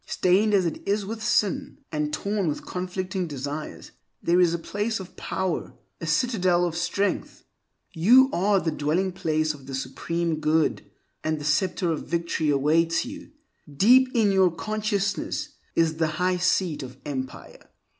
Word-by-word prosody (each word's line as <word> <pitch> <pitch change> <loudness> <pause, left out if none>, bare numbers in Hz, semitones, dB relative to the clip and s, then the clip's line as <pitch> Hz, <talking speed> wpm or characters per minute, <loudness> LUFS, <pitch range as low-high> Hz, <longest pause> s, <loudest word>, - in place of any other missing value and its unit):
stained 195 +4 +2
as 195 -3 +3
it 165 - -3
is 200 0 +1
with 220 +2 -5
sin, 220 +6 0
and 150 -1 -1
torn 200 +4 -1
with 150 - -3
conflicting 185 0 -3
desires, 145 +1 -6 0.3
there 175 +1 +2
is 175 -2 +4
a 170 - 0
place 205 +6 -2
of 185 -1 -10
power, 190 -3 -3 0.2
a 165 - -5
citadel 180 -1 +2
of 170 -2 -3
strength. 175 +4 -2 0.5
You 235 +11 +6
are 195 +2 +3
the 165 - -1
dwelling 160 +6 0
place 155 -3 0
of 140 -3 -14
the 135 - -4
Supreme 160 +5 -2
Good, 155 +1 +1 0.4
and 155 0 0
the 145 - -7
Scepter 175 +3 +1
of 160 - -4
Victory 170 -2 -1
awaits 160 - +2
you: 290 +3 -9 0.4
deep 250 - +5
in 215 -4 +4
your 190 -1 +4
consciousness 210 - -2 0.3
is 160 -1 +2
the 160 -1 +2
High 180 +1 +1
Seat 180 -3 +1
of 130 -1 -9
Empire. 130 -3 -7
175 Hz, 155 wpm, -25 LUFS, 155-200 Hz, 0.5 s, You